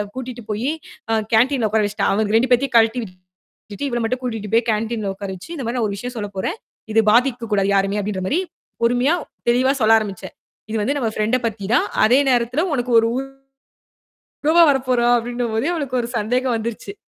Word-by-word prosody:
கூட்டிட்டு 250 -2 -6
போயி 220 +6 -1 0.4
அ - - +2 0.2
கேண்டீன்ல 240 +1 +3
உக்கார 215 +1 +2
வெச்சிட்டா. 205 +1 -1
அவங்க 210 +1 +1
2 240 +3 +3
பேத்தையும் 250 +1 +2
கழட்டி 225 +2 +3
விட்டுட்டு 185 +4 -11
இவள 240 -1 -1
மட்டும் 255 +3 -2
கூட்டிட்டு 225 -4 -4
போய் 230 +1 +4
கேண்டீன்ல 220 0 -2
உக்கார 200 0 -6
வச்சு, 185 - -12
இந்த 270 - -5
மாரி 235 +2 -2
நான் 230 - +1
ஒரு 200 - -4
விஷயம் 245 +4 -6
சொல்லப் 205 -2 -5
போறேன். 190 - -2 0.4
"இது 225 - +5
பாதிக்கக் 240 -1 +1
கூடாது 200 -1 +2
யாருமே." 195 +1 +1
அப்படீன்ற 195 -2 -3
மாரி, 320 - +1 0.4
பொறுமையா 245 +7 +3 0.3
தெளிவா 255 +2 +3
சொல்ல 220 +1 +6
ஆரம்பிச்சேன். 200 -4 -7 0.4
"இது 220 - -2
வந்து 280 +7 0
நம்ம 230 - 0
ஃப்ரெண்ட 215 +4 +1
பத்தி 210 -3 -6
தான். - - +2 0.2
அதே 250 +5 +5
நேரத்துல 245 +6 +1
உனக்கு 245 -1 -2
ஒரு 225 - +1 1.2
உறவா 320 +3 +2
வரப்போறா" 255 -3 +1
அப்டின்னும் 240 0 -3
போதே 235 +8 0
அவளுக்கு 275 -6 -2
ஒரு 235 - -5
சந்தேகம் 245 +4 0
வந்துருச்சு. 230 - -5
235 Hz, 185 wpm, -20 LUFS, 210-250 Hz, 1.2 s, சொல்ல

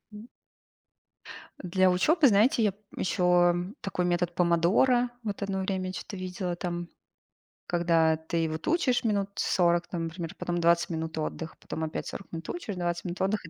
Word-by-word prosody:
М. 210 +3 -10 1.3
Для 185 0 +2
учёбы, 300 - +4
знаете, 225 +2 +4
я 205 -3 +2 0.2
ещё 180 -1 +3 0.3
такой 180 -2 -2
метод 175 0 0
"Помодоро". 185 +9 +3
Вот 205 -2 -4
одно 195 -1 -2
время 190 -1 -2
я 185 - -5
чё-то 195 - -7
видела 185 -1 -3
там. 175 0 -4 0.8
Когда 165 -2 +3
ты 160 +1 -2
вот 155 0 -5
учишь 295 -7 +2
минут 200 -3 0
40 175 -1 +2
там, 170 -2 -3
например, 165 0 -6
потом 175 0 -2
20 170 0 +3
минут 160 -1 -4
отдыха, 160 +1 -4
потом 160 - -5
опять 155 - -4
40 195 - -8
минут 165 -1 -6
учишь, 280 - -4
20 175 -1 -2
минут 175 -1 -5
отдыха 195 -2 -1
180 Hz, 160 wpm, -28 LUFS, 170-200 Hz, 1.3 s, учёбы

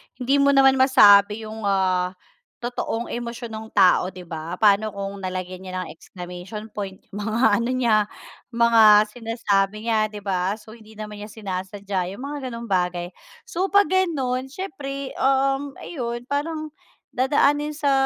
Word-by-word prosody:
hindi 255 +2 0
mo 280 0 +4
naman 270 -1 +5
masabi 210 -5 +6
'yung, 215 -1 -5
ah, 185 -1 +1 0.5
totoong 240 -1 -3
emosyon 235 -1 -5
ng 220 0 -6
tao, 185 -2 +5
'di 185 -1 -11
ba? 165 +1 -6
Paano 210 +1 +4
kung 200 0 -5
nalagyan 185 0 -5
niya 185 0 -4
ng - - -9
exclamation 180 +5 -9
point 195 -2 -6
mga 220 +5 +1
ano 235 +2 -1
niya, 230 -5 +2 0.5
mga 220 -3 +6
sinasabi 215 -3 -1
niya, 220 -2 +2
'di 210 -1 -10
ba? 190 0 0
So, 220 0 -15
hindi 220 -2 -16
naman 210 -1 -8
niya 210 - -7
sinasadya 195 -2 -4
'yung 250 - -9
mga 285 -2 -5
gano'ng 235 0 -7
bagay. 180 -1 0 0.3
So 380 -4 -2
pag 405 0 +4
gano'n 270 -9 0
siyempre, 275 -6 -6
um, 270 +1 +1
ayun 240 -6 -5
parang 310 +3 -3 0.4
dadaanin 290 +3 +2
sa 290 -2 +1
220 Hz, 150 wpm, -23 LUFS, 195-265 Hz, 0.5 s, masabi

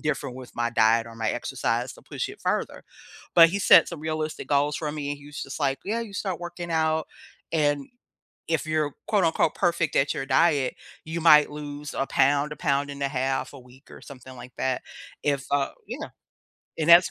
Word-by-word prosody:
different 140 -4 -2
with 130 -1 -11
my 120 0 -1
diet 115 0 +3
or 115 - -11
my 110 -1 -1
exercise - - -2
to - - -17
push - - -4
it - - -11
further. - - -2 0.5
But 165 -1 +8
he 200 - -1
set - - +7
some 170 - -7
realistic 155 0 -3
goals 145 +1 +2
for 150 -2 -3
me 145 -2 -4
and 145 - -4
he 145 - -15
was 150 0 -7
just 135 - -7
like, 135 -1 0
"Yeah, 220 +4 -1
you 225 -3 -7
start 190 -3 -3
working 175 0 -6
out. 160 -1 +1 0.4
And 145 -3 +1 0.6
if 160 -1 0
you're, 155 -2 0 0.2
quote, 200 -5 +3
unquote, 160 -1 +2
'perfect' 170 -4 +1
at 135 +1 +2
your 135 - -4
diet, 140 -1 +2 0.3
you 165 +1 -4
might 150 -2 +7
lose 145 0 -7
a 135 - -1
pound, 145 +2 +2
a - - -7
pound 145 -2 0
and 140 0 -7
a 140 - +1
half 135 0 -2
a 140 - -11
week 125 +3 -19
or - - -12
something 130 -2 -12
like 125 0 -11
that, 130 -1 -1 0.4
if, 140 -2 0
uh" 140 -1 +1 0.2
Yeah, - - -5 0.7
and 160 +1 -1
that's 170 +1 +8
145 Hz, 205 wpm, -25 LUFS, 135-160 Hz, 0.7 s, But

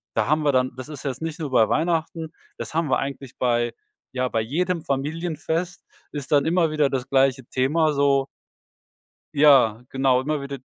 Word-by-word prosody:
da 110 - +2
haben 155 +2 +2
wir 145 - +3
dann 130 -1 +1
das 130 +3 -8
ist 150 -4 -8
jetzt 135 +1 -3
nicht 160 -1 -4
nur 150 -4 -4
bei 115 -4 +4
Weihnachten, 165 0 -1 0.2
das - - -6
haben 160 -1 0
wir 130 - +3
eigentlich 135 -1 -6
bei 120 -1 +1 0.4
ja, 130 0 0
bei 115 - 0
jedem 170 +9 -1
Familienfest 160 +4 -3 0.3
ist 145 -2 -6
dann 145 -1 +4
immer 165 0 +2
wieder 150 -2 +2
das 130 -2 -3
gleiche 135 -1 +2
Thema 150 +5 +1
so 140 -1 +2 1.1
ja 135 -6 +5
genau 130 -1 +2
immer 150 +1 -2
wieder 140 0 -6
140 Hz, 180 wpm, -23 LUFS, 130-155 Hz, 1.1 s, ja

